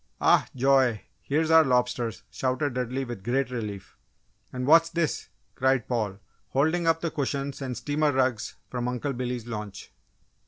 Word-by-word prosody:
"Oh, -, -, +5 dB
joy! 130 Hz, -4 st, +3 dB, 0.2 s
Here's 155 Hz, +3 st, 0 dB
our 160 Hz, 0 st, +8 dB
lobsters!" 125 Hz, -3 st, 0 dB
shouted 130 Hz, +1 st, -1 dB
Dudley, 125 Hz, +2 st, -2 dB
with 120 Hz, -6 st, -7 dB
great 130 Hz, +3 st, 0 dB
relief. 105 Hz, -5 st, -6 dB, 0.5 s
"And 125 Hz, 0 st, -3 dB
what's 165 Hz, +3 st, +6 dB
this?" 165 Hz, -3 st, -2 dB, 0.2 s
cried 130 Hz, -2 st, +1 dB
Paul, 110 Hz, -6 st, -1 dB, 0.3 s
holding 160 Hz, +5 st, +1 dB
up 165 Hz, 0 st, +3 dB
the 165 Hz, -, -1 dB
cushions 140 Hz, -1 st, -3 dB
and 130 Hz, -2 st, -4 dB
steamer 150 Hz, 0 st, +1 dB
rugs 130 Hz, -5 st, 0 dB
from 125 Hz, -1 st, -3 dB
Uncle 125 Hz, +3 st, -2 dB
Billy's 125 Hz, -2 st, -3 dB
launch. 105 Hz, -4 st, -7 dB
130 Hz, 150 wpm, -27 LUFS, 120-145 Hz, 0.5 s, our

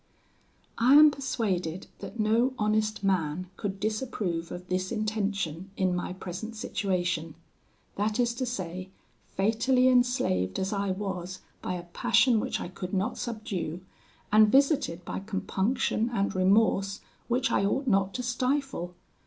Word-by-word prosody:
"I 250 Hz, +4 st, +6 dB
am 300 Hz, 0 st, +9 dB
persuaded 195 Hz, -, -2 dB
that 235 Hz, -, -8 dB
no 230 Hz, +5 st, +2 dB
honest 215 Hz, 0 st, 0 dB
man 180 Hz, -2 st, 0 dB
could 195 Hz, -1 st, -4 dB
disapprove 210 Hz, -6 st, -2 dB
of 180 Hz, +1 st, -7 dB
this 185 Hz, +1 st, -1 dB
intention 200 Hz, -6 st, -2 dB
in 185 Hz, -1 st, +2 dB
my 180 Hz, -, -3 dB
present 190 Hz, +5 st, -6 dB
situation; 180 Hz, -7 st, -2 dB, 0.6 s
that 210 Hz, +3 st, 0 dB
is 240 Hz, -1 st, +2 dB
to 255 Hz, +1 st, -3 dB
say, 185 Hz, -5 st, -4 dB, 0.4 s
fatally 235 Hz, +6 st, +2 dB
enslaved 245 Hz, -, +2 dB
as 190 Hz, +2 st, -1 dB
I 200 Hz, -1 st, -1 dB
was 190 Hz, -1 st, -4 dB, 0.2 s
by 180 Hz, -, -3 dB
a 175 Hz, -, -5 dB
passion 220 Hz, +7 st, +3 dB
which 255 Hz, +4 st, -2 dB
I -, -, -4 dB
could 180 Hz, +1 st, -5 dB
not 190 Hz, +3 st, -1 dB
subdue, 215 Hz, -7 st, -4 dB, 0.5 s
and 215 Hz, 0 st, +6 dB
visited 270 Hz, -, +2 dB
by -, -, -4 dB
compunction 215 Hz, +4 st, -1 dB
and 200 Hz, -4 st, 0 dB
remorse 195 Hz, +1 st, +3 dB, 0.3 s
which 250 Hz, +2 st, +1 dB
I -, -, +2 dB
ought 270 Hz, +8 st, 0 dB
not 195 Hz, -4 st, +2 dB
to 250 Hz, -, -2 dB
stifle. 250 Hz, -7 st, -1 dB
200 Hz, 140 wpm, -28 LUFS, 185-235 Hz, 0.6 s, am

